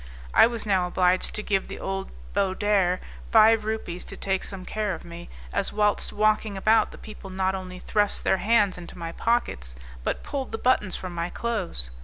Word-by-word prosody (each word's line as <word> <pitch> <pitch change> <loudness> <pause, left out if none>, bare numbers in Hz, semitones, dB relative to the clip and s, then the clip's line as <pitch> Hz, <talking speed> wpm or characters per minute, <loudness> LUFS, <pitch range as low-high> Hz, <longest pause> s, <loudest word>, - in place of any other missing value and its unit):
I - - +8
was 235 -2 -4
now 190 -3 +2
obliged 180 +1 +2
to 215 - -2
give 195 -2 0
the - - -7
old 195 0 -4 0.2
Baudarre 195 -1 +2 0.3
five 220 -1 +6
rupees 215 -5 -3
to - - -7
take 190 -1 -1
some 190 -2 -6
care 210 -4 -1
of 160 - -12
me, 170 0 -9 0.2
as 200 - 0
whilst 210 -1 +1
walking 215 -1 +1
about, 220 +3 +4
the - - -12
people 210 -2 -10
not 190 0 0
only 185 -1 -6
thrust 205 +2 0
their 190 - +3
hands 205 -3 +2
into 175 +1 -10
my 165 -1 -5
pockets, 65 - -1 0.3
but - - -2
pulled 275 -2 -4
the 225 - -2
buttons 215 -7 +2
from 185 -1 -5
my 170 0 -2
clothes. 180 - -3
195 Hz, 190 wpm, -26 LUFS, 180-215 Hz, 0.3 s, I